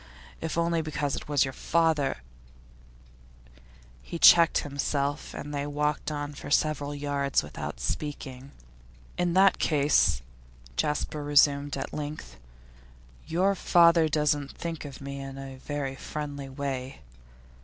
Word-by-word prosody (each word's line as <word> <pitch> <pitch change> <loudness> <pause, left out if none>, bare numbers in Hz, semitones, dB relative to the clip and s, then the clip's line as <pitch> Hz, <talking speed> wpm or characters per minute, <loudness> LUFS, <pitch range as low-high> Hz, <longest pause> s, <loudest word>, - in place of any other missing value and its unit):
If 160 0 -3
only 170 0 +1
because 150 -2 -2
it - - -7
was 145 -2 +3
your 135 - -5
father 155 - +1 0.8
' - - -26 0.7
He 170 - -6
checked 170 0 +7
himself 140 0 -2
and 145 +1 -6
they 145 0 -2
walked 150 +1 -1
on 145 -1 -4
for 145 - -9
several 145 -1 +1
yards 140 -1 0
without 75 -4 -6
speaking. 135 - -5 0.7
'In 175 -1 +1
that 190 +1 +5
case,' 145 - +3 0.5
Jasper 150 - -1
resumed 145 0 +3
at - - -5
length, 145 - -6 0.9
'your 185 +5 +2
father 170 -3 +5
doesn't 150 -2 0
think 165 -2 -5
of 140 -2 -9
me 140 0 -6
in 135 0 -7
a 135 -1 -8
very 140 0 -4
friendly 145 -1 -6
way? 135 -1 -5
145 Hz, 130 wpm, -28 LUFS, 140-155 Hz, 0.9 s, checked